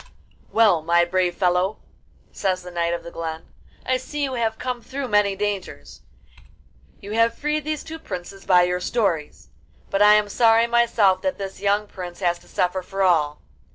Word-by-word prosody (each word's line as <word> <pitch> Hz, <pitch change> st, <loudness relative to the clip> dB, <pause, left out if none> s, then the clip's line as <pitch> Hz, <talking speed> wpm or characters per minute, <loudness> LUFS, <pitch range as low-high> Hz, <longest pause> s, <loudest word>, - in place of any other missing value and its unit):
'Well, 210 Hz, -7 st, +4 dB
my 170 Hz, +2 st, +3 dB
brave 180 Hz, 0 st, 0 dB
fellow,' 180 Hz, +3 st, +1 dB, 0.5 s
says 185 Hz, -2 st, -2 dB
the 180 Hz, -, -9 dB
Knight 170 Hz, -1 st, -1 dB
of 170 Hz, -, -8 dB
the 170 Hz, -, -9 dB
Glen, 160 Hz, -1 st, -5 dB, 0.4 s
'I 255 Hz, -, +1 dB
see 290 Hz, +3 st, -5 dB
you 270 Hz, -2 st, -2 dB
have 225 Hz, -2 st, -1 dB
come 250 Hz, -1 st, -4 dB
through 270 Hz, +2 st, -5 dB
many 205 Hz, -3 st, +2 dB
dangers: 190 Hz, -, -5 dB, 1.0 s
you 200 Hz, -, -9 dB
have 230 Hz, +1 st, +2 dB
freed 300 Hz, 0 st, -2 dB
these 305 Hz, -1 st, -3 dB
two 320 Hz, 0 st, -8 dB
princes 195 Hz, -, -8 dB
by 180 Hz, -2 st, +5 dB
your 180 Hz, 0 st, 0 dB
stories; 180 Hz, -7 st, -2 dB, 0.4 s
but 195 Hz, -, +1 dB
I 210 Hz, 0 st, +8 dB
am 210 Hz, -1 st, +2 dB
sorry 225 Hz, +2 st, +4 dB
myself 235 Hz, -5 st, +3 dB
that 280 Hz, 0 st, -2 dB
this 195 Hz, -1 st, -7 dB
young 205 Hz, +1 st, +1 dB
prince 180 Hz, -4 st, -9 dB
has 175 Hz, -1 st, +1 dB
to -, -, -21 dB
suffer 185 Hz, +1 st, -1 dB
for 195 Hz, +2 st, -3 dB
all. 155 Hz, -5 st, +2 dB
195 Hz, 180 wpm, -23 LUFS, 180-230 Hz, 1.0 s, I